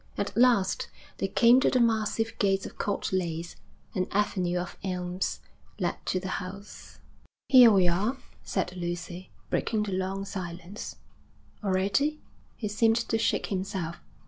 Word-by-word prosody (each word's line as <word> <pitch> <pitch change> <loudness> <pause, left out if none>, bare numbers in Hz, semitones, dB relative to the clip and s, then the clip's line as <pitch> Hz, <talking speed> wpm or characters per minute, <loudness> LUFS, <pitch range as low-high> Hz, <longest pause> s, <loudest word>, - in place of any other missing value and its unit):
At 200 0 -2
last 230 -6 +3 0.3
they - - +1
came 235 +6 +6
to - - +3
the 255 - +2
massive 225 -1 +1
gates 195 -2 +2
of - - -10
Court 205 - -1
Leys. 170 -2 -2 0.4
An 185 -4 0
avenue 185 -3 0
of 175 0 -4
elms 180 -1 -2 0.4
led - - -2
to 185 - +1
the 185 0 -3
house. 195 +3 -10 0.5
'Here 250 -3 +9
we 190 -4 +5
are,' 205 +10 +1 0.2
said 180 -2 -2
Lucy, 175 +1 -5 0.2
breaking 220 -2 +1
the 205 - -4
long 190 +1 -2
silence. 180 0 -6 0.7
'Already?' 200 +11 +1 0.4
He 215 - -4
seemed 225 +2 +3
to 225 - +1
shake - - +1
himself. 185 -3 -3
195 Hz, 145 wpm, -28 LUFS, 180-215 Hz, 0.7 s, Here